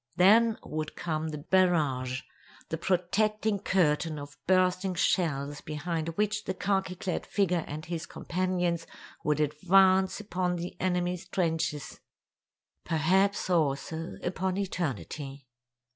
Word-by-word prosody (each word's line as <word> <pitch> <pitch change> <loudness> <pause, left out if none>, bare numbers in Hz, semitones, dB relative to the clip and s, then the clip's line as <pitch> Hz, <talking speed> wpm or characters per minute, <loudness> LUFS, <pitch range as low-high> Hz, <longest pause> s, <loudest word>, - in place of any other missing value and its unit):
Then 220 +5 +5
would 155 0 -4
come 160 -2 -2
the 150 -1 -6
barrage—the 150 -5 0
protecting 205 +4 +1
curtain 165 -4 +1
of 145 0 -8
bursting 185 0 +2
shells 145 -5 0
behind 160 +2 -3
which 210 0 0
the 190 - -2
khaki 190 -1 0
clad 180 0 -3
figure 180 -5 +1
and 155 +2 -6
his 170 -2 -4
companions 180 -2 -1 0.4
would 150 -1 +1
advance 185 +6 +4
upon 185 -3 -1
the 175 +1 -5
enemy's 180 -1 0
trenches—perhaps 165 +2 -2
also 160 +1 0
upon 185 +1 -1
eternity. 145 - -4
175 Hz, 105 wpm, -29 LUFS, 155-190 Hz, 0.4 s, Then